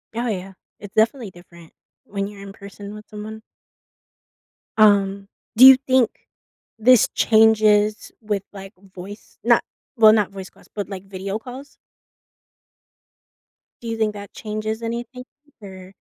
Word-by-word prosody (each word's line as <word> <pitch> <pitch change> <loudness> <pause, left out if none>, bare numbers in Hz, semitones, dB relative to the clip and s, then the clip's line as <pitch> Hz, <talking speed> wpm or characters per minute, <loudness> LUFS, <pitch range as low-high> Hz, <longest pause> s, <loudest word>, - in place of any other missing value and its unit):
Oh 240 +1 -2
yeah. 195 -3 -5 0.3
It's 205 +1 -11
definitely 225 -1 +1
different 170 -2 -17 0.3
when 200 0 -4
you're 205 -1 -12
in 195 0 -10
person 200 +1 -11
with 210 0 -11
someone. 215 +1 -9 1.4
Um, 200 -2 +3 0.3
do 250 +4 +8
you 265 0 +11
think 260 -3 +3 0.7
this 245 +1 +5
changes 215 -1 +3
with, 210 -3 -3
like, 195 0 -10 0.2
voice 195 +4 -11
not - - +3 0.3
well, 215 -1 +7
not 210 -3 +1
voice 190 -1 -9
calls, - - -22
but, 205 -2 -4
like, 195 -1 -8
video 195 +2 -5
calls? 260 +4 -11 2.1
Do 235 - -8
you 225 - -3
think 215 -1 0
that 205 -1 -11
changes 215 +1 -5
anything, 240 +2 -6 0.4
or 190 -1 -12
210 Hz, 135 wpm, -21 LUFS, 195-220 Hz, 2.1 s, you